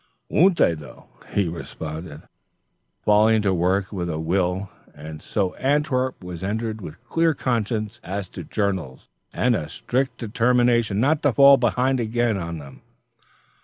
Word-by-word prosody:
"Won't 180 +2 +4
they, 85 - +4
though!" 75 -3 -12 0.2
he 100 -3 +1
responded, 80 -1 -7 0.8
falling 105 +1 +4
to 95 -2 +2
work 95 +3 0
with 90 -3 -3
a 80 - -2
will. 90 +3 -1 0.2
And 75 0 -9
so 95 -4 -1
Antwerp 130 -4 0
was 90 -1 -7
entered 110 +2 -3
with 85 -1 -10
clear 165 -1 +2
consciences 110 -4 -2
as 95 +2 -4
to 90 - -8
journals, 95 -8 -3 0.2
and 125 -1 +2
a 75 -6 -4
strict 130 +9 -2
determination 120 -2 +2
not 145 +5 +2
to 145 -4 +2
fall 140 +3 +8
behind 125 +2 +1
again 120 0 0
on 85 -2 -4
them. 70 -3 -12
105 Hz, 145 wpm, -23 LUFS, 90-125 Hz, 0.8 s, fall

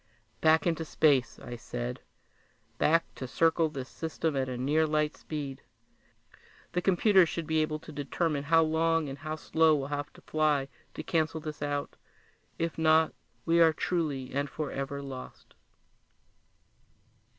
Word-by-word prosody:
"Back 160 0 +4
into 165 -2 0
space," 145 -5 +2
I 120 - -6
said. - - -5 0.8
"Back 165 +2 +4
to 130 - -6
circle 165 +3 +2
this 135 -4 -6
system 160 0 -3
at 130 -1 0
a 125 - -4
near 150 +5 +2
light 150 0 0
speed. 140 -4 -6 1.1
The 180 - 0
computers 190 -1 +4
should 170 - -3
be 160 0 +1
able 155 0 -1
to 155 - -12
determine 145 +1 -2
how 165 +2 +5
long 160 -1 +1
and 135 - -7
how 155 0 -4
slow 160 0 +3
we'll 140 -1 -3
have 145 0 -3
to - - -16
fly 150 -3 +1 0.3
to - - -5
cancel 160 -1 0
this 155 -1 -7
out. 145 0 -3 0.6
If 165 -1 -2
not, 160 0 +4 0.3
we 170 +1 +4
are 160 -1 +6
truly 150 -7 -2
and 140 +1 -1
forever 140 -2 -4
lost!" 130 -2 -9
155 Hz, 150 wpm, -29 LUFS, 140-160 Hz, 1.1 s, are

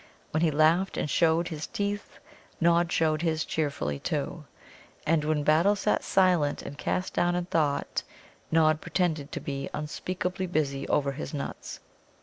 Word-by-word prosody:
When 155 - 0
he 165 - +4
laughed 160 +5 +3
and - - 0
showed 165 +2 +2
his 155 -2 -5
teeth, 205 0 -3 0.4
Nod 170 0 +3
showed 155 -2 +2
his 160 -2 0
cheerfully, 140 - -2
too. - - -3 0.6
And 155 0 +2
when 150 -1 0
Battle 165 +8 +4
sat 205 +1 0
silent 180 -6 +2
and 145 - -7
cast 185 +5 -2
down 175 0 +2
in 175 0 -1
thought, 150 -5 0 0.5
Nod 155 -1 +4
pretended 160 -4 -1
to - - -3
be 140 -1 -4
unspeakably 180 +5 -3
busy 140 -5 -1
over 140 -1 +1
his 150 +2 -6
nuts. 140 - -6
160 Hz, 150 wpm, -28 LUFS, 150-175 Hz, 0.6 s, he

